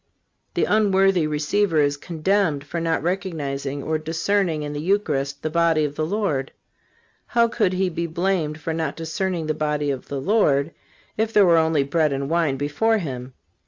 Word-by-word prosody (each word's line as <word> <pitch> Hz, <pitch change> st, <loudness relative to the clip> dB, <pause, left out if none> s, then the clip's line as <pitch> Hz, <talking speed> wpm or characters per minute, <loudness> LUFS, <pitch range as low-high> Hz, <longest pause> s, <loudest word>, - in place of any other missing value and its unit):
The -, -, +2 dB
unworthy 195 Hz, -5 st, +3 dB
receiver 155 Hz, +4 st, +1 dB
is 145 Hz, -1 st, +2 dB
condemned 165 Hz, 0 st, 0 dB
for 170 Hz, +4 st, -4 dB
not 165 Hz, -1 st, 0 dB
recognizing 145 Hz, -7 st, -3 dB
or 155 Hz, 0 st, -1 dB
discerning 165 Hz, +1 st, 0 dB
in 145 Hz, 0 st, -4 dB
the 145 Hz, -, -4 dB
Eucharist 145 Hz, -7 st, -1 dB
the 155 Hz, -, -1 dB
body 165 Hz, -2 st, +3 dB
of 145 Hz, -, -4 dB
the 155 Hz, +1 st, -2 dB
Lord. 165 Hz, -9 st, -1 dB, 0.8 s
How 235 Hz, -1 st, +3 dB
could 220 Hz, -5 st, 0 dB
he 185 Hz, +1 st, +1 dB
be 170 Hz, -1 st, -3 dB
blamed 165 Hz, -2 st, -1 dB
for 160 Hz, +1 st, -3 dB
not 160 Hz, -3 st, -2 dB
discerning 165 Hz, +1 st, -2 dB
the 155 Hz, -, 0 dB
body 150 Hz, -1 st, -1 dB
of 130 Hz, -2 st, -6 dB
the 140 Hz, -, -4 dB
Lord, 150 Hz, -5 st, +2 dB, 0.5 s
if 220 Hz, +1 st, 0 dB
there 205 Hz, -3 st, +5 dB
were 170 Hz, -2 st, +5 dB
only 160 Hz, -3 st, +2 dB
bread 150 Hz, +2 st, +1 dB
and 140 Hz, +2 st, -3 dB
wine 165 Hz, -5 st, +1 dB
before 150 Hz, +11 st, +1 dB
him? 130 Hz, -8 st, -5 dB
160 Hz, 175 wpm, -23 LUFS, 145-190 Hz, 0.8 s, there